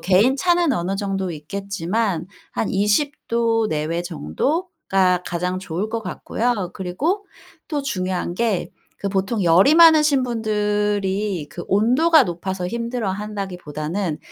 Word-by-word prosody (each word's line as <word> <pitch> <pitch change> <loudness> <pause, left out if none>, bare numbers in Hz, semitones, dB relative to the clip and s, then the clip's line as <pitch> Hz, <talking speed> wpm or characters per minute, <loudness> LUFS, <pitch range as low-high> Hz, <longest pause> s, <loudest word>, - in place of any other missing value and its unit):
개인 200 +9 +3
차는 345 0 +2
어느 190 -3 -1
정도 195 -2 -2
있겠지만 185 +3 -2 0.3
한 220 - -1
20 210 +9 +2 0.2
도 230 -1 +2
내외 155 +2 -1
정도가 190 - 0
가장 180 +1 -2
좋을 185 +2 -3
것 230 - -2
같고요. 210 0 -2
그리고 290 - -2 0.4
또 295 -3 -2
중요한 185 -8 -2
게 220 -3 0 0.3
그 200 - -1
보통 195 +2 -1
열이 180 - +6
많으신 305 -5 +6
분들이 210 -5 -1
그 175 - -7
온도가 255 - +4
높아서 180 +1 -4
힘들어 230 -1 -2
한다기보다는 185 -4 -4
200 Hz, 260 characters per minute, -21 LUFS, 180-235 Hz, 0.4 s, 열이